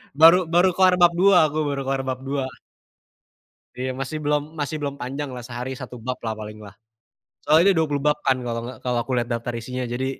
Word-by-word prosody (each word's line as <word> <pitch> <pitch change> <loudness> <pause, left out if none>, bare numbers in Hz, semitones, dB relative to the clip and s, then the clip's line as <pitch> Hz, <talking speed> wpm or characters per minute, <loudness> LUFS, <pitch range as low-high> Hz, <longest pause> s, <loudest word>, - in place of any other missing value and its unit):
Baru 165 +4 +8 0.2
baru 175 +2 +5
kelar 185 -1 +5
bab 175 -1 +7
2, 195 0 +6
aku 150 - -5
baru 140 -1 -2
kelar 135 0 0
bab 130 -1 -2
2. 135 0 -2 1.3
Iya, 130 +1 -3
masih 135 +3 -3
belum 150 0 +1 0.2
masih 145 +1 -2
belum 140 -1 -3
panjang 140 +4 -4
lah 125 - -7
sehari 125 +1 -5
1 125 -2 -9
bab 125 +2 -4
lah 110 - -1
paling 105 0 -8
lah. 100 -1 -12 0.7
Soalnya 160 +3 +5
ini - - +2
20 145 -3 0
bab 150 - +3
kan 130 - +2
kalau 115 -1 -2
gak - - -9
kalau 125 -1 0
aku 135 - -7
lihat 120 -1 0
daftar 115 +1 -3
isinya. 125 +2 -5
Jadi 125 +2 -3
135 Hz, 210 wpm, -23 LUFS, 125-150 Hz, 1.3 s, Baru